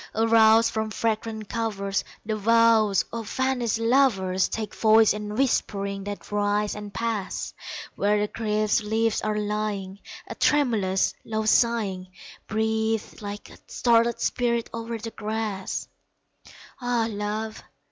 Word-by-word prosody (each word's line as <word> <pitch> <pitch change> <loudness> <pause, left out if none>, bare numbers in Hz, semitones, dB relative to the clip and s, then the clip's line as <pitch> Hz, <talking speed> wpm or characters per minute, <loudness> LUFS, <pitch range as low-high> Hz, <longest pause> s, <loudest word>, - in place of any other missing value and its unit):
Aroused 225 0 +5
from 220 0 -2
fragrant 220 -1 -2
covers, 200 -4 -2 0.2
The 215 0 -1
vows 225 -2 +4
of 230 -2 -5
vanished 260 -4 0
lovers 230 -7 +2
Take 220 -1 -4
voice 220 -1 +5
in 210 0 -5
whisperings 200 -6 -1
that 205 0 -7
rise 205 0 +1
and 210 -1 -7
pass; 220 -3 -3 0.4
Where 205 +1 +2
the 210 - 0
crisped 215 0 0
leaves 225 +1 +1
are 215 0 -1
lying 205 -2 -3 0.3
A - - -7
tremulous, 220 -10 +2
low 220 -1 -2
sighing 215 -5 +2 0.4
Breathes 220 0 -1
like 205 0 -7
a - - -15
startled 235 0 +2
spirit 235 -2 0
o'er 230 0 -4
the 225 +1 -7
grass. 215 -3 -3 0.9
Ah, 245 -2 +1
Love! 215 +1 -4
220 Hz, 125 wpm, -25 LUFS, 205-230 Hz, 0.9 s, Aroused